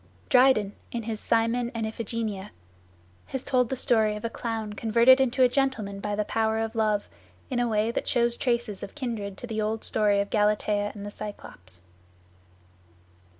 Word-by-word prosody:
Dryden, 250 -6 +4 0.2
in 235 -1 -3
his 220 -1 -4
"Cymon 230 +2 +1
and 225 -1 -1
Iphigenia," 220 -2 -4 0.8
has 265 -1 -4
told 250 -3 +1
the 265 - -1
story 220 -4 +2
of 210 - -6
a 230 - -2
clown 225 -3 -4
converted 235 +5 +5
into 260 0 +2
a - - +7
gentleman 245 -7 -1
by 205 +1 -2
the 210 0 -1
power 220 0 0
of 225 0 -2
love, 215 -2 +1 0.4
in 250 - 0
a 245 - +2
way 215 +1 +1
that - - -3
shows 235 -1 +2
traces 235 -6 -1
of - - -8
kindred 225 -8 -4
to - - -7
the 220 -2 -3
old 215 +1 -2
story 210 -2 +2
of 200 0 -2
Galatea 210 -1 +1
and 205 -1 -7
the 205 - -6
Cyclops. 95 - -10
220 Hz, 175 wpm, -27 LUFS, 210-240 Hz, 0.8 s, a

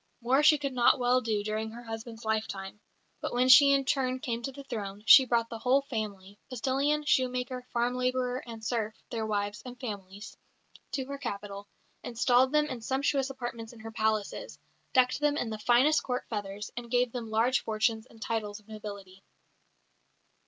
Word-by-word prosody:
More 250 +4 +3
she 300 0 +6
could 275 -2 -3
not 245 +1 +4
well 250 0 +2
do 215 -3 -1
during 215 +1 -2
her 235 +2 -10
husband's 225 0 -8
lifetime, 210 -2 -3 0.4
but - - -3
when 250 +1 +3
she 280 +2 +9
in 275 -1 +3
turn 260 -1 0
came 235 -2 -3
to 270 - -4
the 280 +1 -10
throne, 210 -6 -6
she 270 -1 +9
brought 230 -1 +1
the 230 - -5
whole 265 +3 +3
family 205 -5 -5
postillion, 275 +4 0
shoemaker, 250 -2 0
farm 240 +1 0
labourer 250 0 -1
and 225 -1 -8
serf, 220 -2 -1 0.2
their 225 -2 -2
wives 205 0 -2
and 250 -1 -10
families 205 -2 -7 0.6
to 270 -1 -2
her 280 +1 -6
capital, 205 -5 -6 0.3
installed 245 +2 +2
them 300 0 +3
in 255 -5 -6
sumptuous 270 +2 0
apartments 240 -3 -6
in 235 - -14
her 225 0 -8
palaces, 220 - -2 0.3
decked 255 +1 +3
them 295 0 +1
in 230 - -2
the 215 - -5
finest 245 +8 +4
Court 250 -1 -3
feathers, 205 -1 -5
and 240 -1 -6
gave 245 0 +2
them 235 -2 -5
large 230 +4 +2
fortunes 220 +1 -1
and 225 - -18
titles 215 -2 -3
of 210 - -25
nobility. 200 -3 -9
235 Hz, 180 wpm, -29 LUFS, 215-255 Hz, 0.6 s, she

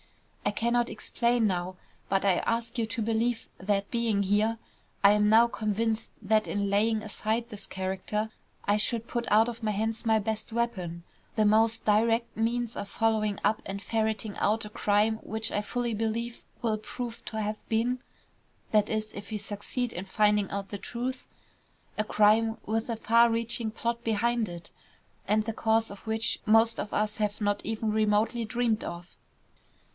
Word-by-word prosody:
I - - +2
cannot 235 +3 +1
explain 235 -1 +1
now, 180 -1 -2 0.3
but 195 0 +1
I 190 -3 +4
ask 230 +1 -2
you 225 - +1
to 230 +1 -3
believe 230 +2 0
that, 200 +1 0
being 230 -4 +1
here, 210 +3 +2 0.5
I 200 - +8
am 210 0 +4
now 225 +2 +7
convinced 220 0 -1
that 215 +1 +2
in 200 0 -1
laying 215 +1 +2
aside 220 +2 -2
this 210 -3 -9
character 190 +3 -3 0.3
I 205 +1 +3
should 230 +2 -1
put 240 -1 -3
out 220 +2 +6
of 235 -1 -5
my 215 - +1
hands 220 +2 -1
my 220 -1 +4
best 220 +1 -3
weapon, 185 -8 -2 0.3
the 215 - +3
most 220 +2 +3
direct 225 +2 +2
means 235 +1 -1
of 200 - -5
following 215 -2 +1
up 215 - +2
and 195 +1 -4
ferreting 220 -1 -1
out 215 +2 +1
a - - -7
crime 210 +1 +2
which 220 +1 -3
I 205 - 0
fully 240 +2 -2
believe 225 +2 -2 0.2
will 220 -2 +1
prove 235 +2 -6
to 220 - -4
have 215 0 -2
been 235 +3 +1 0.7
that 210 -1 +3
is, 215 0 -2
if 205 - -8
we 215 - -1
succeed 210 +4 -3
in 180 - -4
finding 210 0 +2
out 200 -1 -4
the 205 - -5
truth 250 +4 -4 0.7
a 215 - +2
crime 215 +2 +3
with 225 +2 -1
a 230 - 0
far 235 +1 +5
reaching 230 0 0
plot 235 +1 -2
behind 230 0 +1
it, 175 -1 -9 0.6
and 215 +1 +2
the 225 - -2
cause 225 0 +1
of 200 - -11
which 220 +1 0
most 225 +1 +4
of 210 - -3
us 210 0 0
have 210 -1 -1
not 205 -1 0
even 220 0 -1
remotely 215 +2 +2
dreamed 225 0 0
of." 170 +1 -7
220 Hz, 175 wpm, -28 LUFS, 210-230 Hz, 0.7 s, I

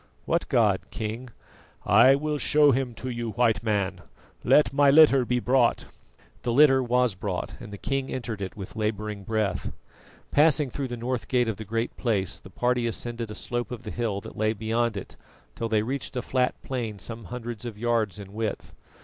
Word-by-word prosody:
"What - - 0
god, - - +2
King?" 115 +4 -5 0.6
"I 135 +1 +6
will 150 +1 -2
show 150 0 +5
him 130 -2 -1
to 130 - -5
you, 120 -2 -4
White 120 -2 +2
Man. 100 -5 -1 0.4
Let 150 - +4
my 140 0 +5
litter 140 -3 +6
be 125 +1 +1
brought." 125 0 +2 0.6
The 120 - -1
litter 135 +1 +6
was 125 -2 +2
brought 95 -1 -4
and 105 - -10
the 100 - -7
king 135 +4 -2
entered 115 -5 -4
it 95 +1 -5
with 95 0 -8
labouring 105 -2 -3
breath. 105 -3 -1 0.6
Passing 150 -2 +3
through 140 +1 -3
the 120 -1 -5
north 120 +1 -3
gate 125 -2 +2
of 110 -3 -2
the 110 - -7
Great 115 +3 -2
Place, 100 -7 -1
the - - -14
party 125 +3 0
ascended 115 0 -2
a 105 - -7
slope 120 0 -3
of 125 -1 -7
the 105 - -6
hill 110 -4 -2
that - - -10
lay 110 +1 +1
beyond 115 +1 -1
it 100 - -8 0.4
till 115 - -4
they 110 -1 +2
reached 135 +3 -4
a 125 - -2
flat 125 -1 0
plain 120 -6 -4
some 115 +2 -7
hundreds 120 0 -6
of 115 -4 -6
yards 115 -3 0
in 100 -1 -10
width. 110 0 -4
120 Hz, 190 wpm, -26 LUFS, 110-125 Hz, 0.6 s, I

